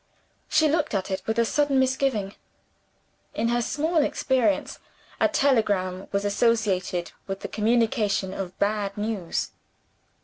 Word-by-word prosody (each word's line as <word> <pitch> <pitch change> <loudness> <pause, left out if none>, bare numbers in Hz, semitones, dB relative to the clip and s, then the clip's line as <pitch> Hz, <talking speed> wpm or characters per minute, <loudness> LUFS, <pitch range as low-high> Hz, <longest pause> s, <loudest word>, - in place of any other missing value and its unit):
She 315 - +4
looked 305 -5 0
at 195 0 -2
it 190 0 -2
with 220 0 0
a 235 - +4
sudden 290 +2 +1
misgiving. 260 -6 +1 1.0
In 230 +1 0
her 240 0 +1
small 315 +7 -1
experience, 260 -8 +1 0.4
a - - +5
telegram 205 -8 +1
was 200 0 -1
associated 200 -5 +1 0.2
with 195 0 -4
the - - -4
communication 215 -3 +1
of 185 -2 -6
bad 200 -1 -1
news. 205 -5 -2
215 Hz, 130 wpm, -25 LUFS, 195-260 Hz, 1.0 s, a